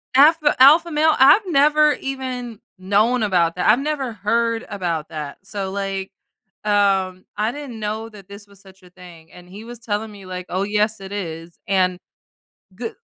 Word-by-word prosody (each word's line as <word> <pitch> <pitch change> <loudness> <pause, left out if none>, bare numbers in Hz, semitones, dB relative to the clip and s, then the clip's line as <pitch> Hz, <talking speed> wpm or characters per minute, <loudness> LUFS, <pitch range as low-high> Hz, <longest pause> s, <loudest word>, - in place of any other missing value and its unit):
Alpha 300 +2 +5
alpha 320 +5 +7
male? 310 +1 +3
I've 270 +11 +7
never 300 -1 +4
even 255 -4 -5 0.2
known 210 +6 +1
about 175 -5 +1
that. 180 - 0
I've 225 +4 +5
never 275 -4 -3
heard 230 +3 -1
about 170 -6 -3
that. 150 -3 -7
So, 195 -1 -5
like, 195 -1 -4 0.5
um, 195 -3 +1
I 215 +2 0
didn't 275 -5 -8
know 215 +1 -4
that 205 -4 -15
this 200 +1 -12
was 200 -1 -20
such 190 -1 -18
a 180 - -18
thing, 175 -2 -15
and 180 0 -15
he 205 +3 -10
was 240 +1 -9
telling 220 -1 -4
me, 200 -2 -13
like, 185 -1 -7
"Oh, 185 +2 -1
yes, 210 +1 0
it 195 0 -9
is." 165 -4 -7
And 185 -2 +1 0.8
g 230 0 -4
205 Hz, 175 wpm, -20 LUFS, 185-245 Hz, 0.8 s, alpha